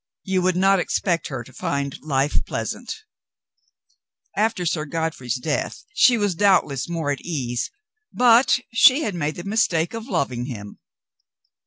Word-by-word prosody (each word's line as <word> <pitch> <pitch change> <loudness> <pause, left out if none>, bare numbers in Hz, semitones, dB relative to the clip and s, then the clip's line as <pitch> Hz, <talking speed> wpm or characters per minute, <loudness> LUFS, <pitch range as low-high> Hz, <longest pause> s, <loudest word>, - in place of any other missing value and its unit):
You 190 -1 0
would 185 0 +1
not 195 +1 +4
expect 175 -2 0
her 130 -4 -5
to 130 - -16
find 140 +1 -3
life 140 -1 0
pleasant - - -4 1.4
After 215 -4 0
Sir 155 -2 -1
Godfrey's 155 -6 -3
death 145 +3 -3
she 250 -11 +5
was 205 -3 +1
doubtless 175 -7 +2
more 165 -4 -1
at 140 - -3
ease, 125 -8 -3 0.4
but 245 +1 +5 0.2
she 260 +6 +6
had 210 - -2
made 155 -3 -2
the 175 - -7
mistake 180 -5 +1
of 225 +1 -6
loving 125 - -1
him. 105 -6 -8
165 Hz, 145 wpm, -22 LUFS, 140-195 Hz, 1.4 s, she